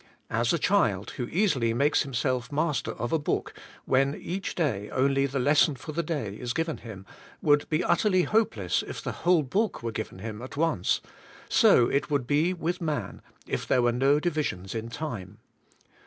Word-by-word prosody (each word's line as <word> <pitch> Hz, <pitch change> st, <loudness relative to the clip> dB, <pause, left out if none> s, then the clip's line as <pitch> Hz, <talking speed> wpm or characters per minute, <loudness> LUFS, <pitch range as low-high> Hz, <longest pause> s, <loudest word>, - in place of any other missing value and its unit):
As 115 Hz, +2 st, +1 dB
a 170 Hz, -, +2 dB
child, 115 Hz, -, +1 dB
who 120 Hz, -, -4 dB
easily 140 Hz, -, +1 dB
makes 145 Hz, +4 st, +3 dB
himself 130 Hz, -2 st, -1 dB
master 150 Hz, 0 st, -1 dB
of 120 Hz, -, -4 dB
a 160 Hz, -, +3 dB
book, 145 Hz, -, -2 dB, 0.3 s
when 135 Hz, +2 st, +2 dB
each 190 Hz, +3 st, -4 dB
day 110 Hz, -, -1 dB
only 135 Hz, +1 st, +2 dB
the 135 Hz, +1 st, -4 dB
lesson 145 Hz, +3 st, +4 dB
for 135 Hz, +5 st, -8 dB
the 165 Hz, +3 st, -1 dB
day 145 Hz, -, -3 dB
is 120 Hz, +3 st, -4 dB
given 165 Hz, +2 st, -1 dB
him, 100 Hz, -5 st, -10 dB, 0.3 s
would 145 Hz, -1 st, +2 dB
be 155 Hz, +2 st, +1 dB
utterly 185 Hz, -4 st, +3 dB
hopeless 120 Hz, -, +1 dB
if -, -, -6 dB
the -, -, -4 dB
whole 175 Hz, -2 st, +2 dB
book 200 Hz, -, -1 dB
were 115 Hz, -, -2 dB
given 110 Hz, -3 st, -5 dB
him 105 Hz, +2 st, -6 dB
at 130 Hz, +2 st, -8 dB
once; 160 Hz, -, +1 dB, 0.5 s
so 120 Hz, -, +6 dB
it 140 Hz, -, 0 dB
would 140 Hz, -4 st, 0 dB
be 150 Hz, +6 st, +2 dB
with 175 Hz, -1 st, -3 dB
man, 145 Hz, -, -3 dB, 0.2 s
if -, -, -3 dB
there 125 Hz, -, +3 dB
were 120 Hz, -, +3 dB
no 135 Hz, +4 st, +3 dB
divisions 150 Hz, -, -2 dB
in 115 Hz, 0 st, -4 dB
time. 115 Hz, -, -6 dB
140 Hz, 185 wpm, -27 LUFS, 120-160 Hz, 0.5 s, so